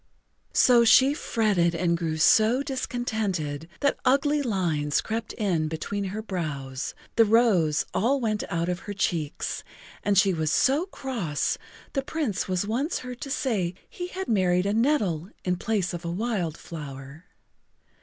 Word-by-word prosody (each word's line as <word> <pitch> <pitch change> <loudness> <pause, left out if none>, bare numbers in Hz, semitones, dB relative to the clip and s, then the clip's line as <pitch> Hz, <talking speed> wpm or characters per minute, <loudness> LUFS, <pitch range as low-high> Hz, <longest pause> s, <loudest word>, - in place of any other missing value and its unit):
So 240 -2 +6
she 265 +4 +6
fretted 200 - +1
and 170 0 +1
grew 165 -2 -2
so 220 - +4
discontented 215 - -3
that 280 - +1
ugly 290 +3 +3
lines 170 - 0
crept 225 0 -3
in 180 -8 0
between 195 +6 -3
her 205 +3 -4
brows, 140 -9 -4 0.2
the 230 - +8
rose 205 -9 +3
all 265 +7 +2
went 215 -4 -1
out 170 0 -1
of 180 0 -1
her - - -2
cheeks, 165 -6 -2 0.4
and 205 -1 +2
she 195 0 +5
was 160 -2 0
so 290 - +3
cross 230 - -2 0.4
the 275 - +1
Prince 275 - -2
was 185 +1 0
once 255 - -1
heard 250 -1 -7
to 275 - -5
say 205 -11 -1
he 355 - -6
had 380 +1 -5
married 185 -4 +2
a 200 - +1
nettle 210 - +1 0.2
in 180 -1 +1
place 195 -2 -1
of 175 +1 -5
a 170 - -3
wild 180 -4 -2
flower. 140 0 -9
200 Hz, 155 wpm, -26 LUFS, 170-240 Hz, 0.4 s, the